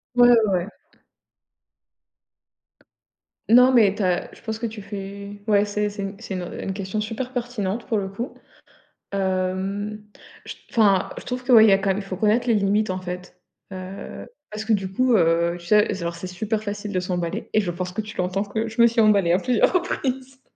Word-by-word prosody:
Ouais, 245 0 +7 0.2
ouais. 180 0 0 2.8
Non, 250 +3 +7
mais 215 -6 +5
tu 210 - -5
as 180 -1 0
je - - -16
pense 220 -1 -4
que 230 - -4
tu 215 -1 -8
fais 200 0 -8
ouais, 205 -1 +4
c'est 210 0 -1
c'est 200 -1 -5
c'est 220 -3 -7
une, 185 -1 -3
heu, 175 - -7
une 195 - -3
question 195 +2 -3
super 235 +4 -5
pertinente 235 -4 -3
pour 225 - 0
le 195 -1 -2
coup, 215 +7 -6 0.8
hem, 195 +2 -2 0.4
je - - -6
t - - -25
enfin, 200 -5 +3
je - - -7
trouve 250 0 -4
que, 255 - +3
ouais, 220 -1 +9
il 220 - +6
y - - +5
a 195 - +6
quand 195 0 -1
même 190 - -1
il - - -5
faut 190 -2 -6
connaître 220 +4 +2
les 230 - +4
limites, 205 +1 +1
en 185 0 -2
fait, 180 0 -8 0.3
heu, 185 +1 -8 0.2
parce 215 +1 -5
que 225 - +2
du 190 -2 -1
coup, 255 +4 +2
heu, 170 -2 +3
tu 175 - -13
sais, 210 -2 +3
alors 170 0 -3
c'est 185 - -7
super 210 +4 -3
facile 205 0 -5
de 185 - 0
s'emballer 180 -2 -3
et 215 - +4
je 180 -4 -2
pense 180 +1 -5
que 220 - -2
tu 215 0 -10
l'entends 185 +2 0
que 220 +2 -3
je 225 +1 0
me 235 - +8
suis 235 0 -1
emballée 200 -6 +4
à 180 - +3
plusieurs 245 +2 +2
reprises. 265 -7 -2
205 Hz, 210 wpm, -23 LUFS, 185-220 Hz, 2.8 s, ouais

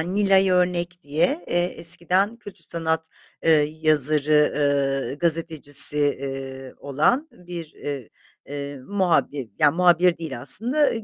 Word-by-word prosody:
Nilay 195 +2 +2
Örnek 180 -1 0
diye, 160 +4 0
eee, 175 0 +1
eskiden 180 +5 -1
kötü 205 -5 -13
sanat, 160 -1 -2 0.4
eee, 165 - +5 0.3
yazarı, 150 0 +3 0.6
eee, - - -5
gazetecisi, 155 -3 +1
eee, 135 -2 -3
olan 155 - 0
bir, 175 -3 -9 0.8
eee, 140 0 -6
muhabir, 170 - 0
ya 150 -1 +5
muhabir 175 +1 +3
değil 155 -7 -6
aslında 245 - +2
165 Hz, 110 wpm, -23 LUFS, 145-180 Hz, 0.8 s, eee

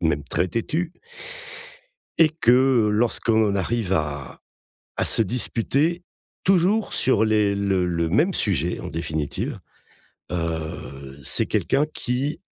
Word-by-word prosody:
même 75 -4 0
très 90 +6 -1
têtu. 160 - -2 1.3
Et 160 -2 +7
que 130 -6 +3
lorsqu'on 110 0 +2
en 100 - 0
arrive 100 0 -1
à 75 -5 -3 0.6
à - - 0
se 115 - +3
disputer 140 - 0 0.4
toujours 195 +3 +2
sur 120 -4 +2
les 105 -2 +2
le 100 -2 +1
le 85 -2 -1
même 155 - +2
sujet, 90 - 0
en - - -6
définitive, 80 -2 -3 0.7
heu, 80 -5 -5
c'est 70 - 0
quelqu'un 145 - +1
qui 140 +7 -2
105 Hz, 120 wpm, -23 LUFS, 85-135 Hz, 1.3 s, Et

